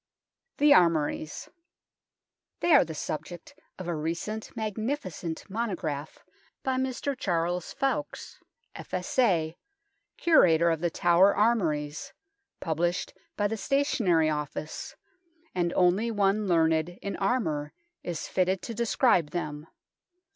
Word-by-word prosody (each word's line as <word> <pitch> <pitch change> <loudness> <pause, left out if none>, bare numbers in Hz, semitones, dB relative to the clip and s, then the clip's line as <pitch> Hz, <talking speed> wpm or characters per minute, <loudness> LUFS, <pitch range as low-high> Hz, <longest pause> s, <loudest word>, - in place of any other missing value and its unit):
THE 290 0 +6
ARMOURIES 155 - +1 1.1
They 345 - +4
are 285 - +8
the 160 -2 -7
subject 160 - -6 0.2
of 185 - -7
a 175 - -1
recent 170 +8 -4
magnifi 220 - -3
cent 160 -1 -6
monograph 180 -9 -4 0.4
by 260 -1 0
Mr. 265 +2 -2
Charles 175 -6 -1
ffoulkes, 275 +1 -3 0.3
F.S.A., 180 -4 0 0.6
Curator 170 - +5
of 165 - -1
The 175 +1 0
Tower 175 +4 +4
Armouries, 160 -10 0 0.5
published 170 +3 -1 0.2
by 205 - +2
the 225 +2 -3
Stationary 215 - +2
Office, 150 +1 -5 0.6
and 175 -1 0
only 185 +6 +3
one 205 -1 +1
learned 165 0 +2
in 200 - -3
armour 160 -10 -1 0.3
is 170 -3 -4
fitted 185 0 0
to 230 - -5
describe 230 - +2
them. 150 -2 -5
180 Hz, 110 wpm, -28 LUFS, 160-220 Hz, 1.1 s, are